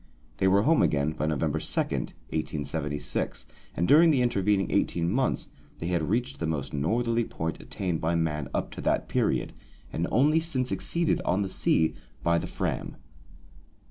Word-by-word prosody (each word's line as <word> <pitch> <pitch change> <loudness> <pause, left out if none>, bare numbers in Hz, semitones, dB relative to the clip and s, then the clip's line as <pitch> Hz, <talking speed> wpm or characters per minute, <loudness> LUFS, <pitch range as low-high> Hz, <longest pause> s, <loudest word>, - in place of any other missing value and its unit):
They 95 - +2
were 100 +2 +4
home 160 +5 +4
again 75 +1 +2
by 80 - -2
November 75 -3 0
2, - - -1
1876, 75 -2 -3 0.3
and 85 - +1
during 165 +3 +7
the 135 -5 +3
intervening 100 -4 +1
eighteen 85 0 +1
months 130 +5 0 0.3
they 85 - -4
had 85 -3 0
reached 125 +6 -1
the 80 - -1
most 70 -3 -3
northerly 115 +11 +1
point 80 -6 -4
attained 90 -4 -3
by 80 +2 +1
man 75 -4 -1
up - - -2
to - - -7
that - - +1
period, - - 0 0.4
and 85 - -1
only 150 +6 +4
since 130 -6 -2
exceeded, 170 -1 0
on 95 +3 +1
the 95 - -3
sea, 80 -3 +2 0.3
by 85 0 +3
the - - -5
Fram. - - -3
90 Hz, 165 wpm, -27 LUFS, 80-120 Hz, 0.4 s, during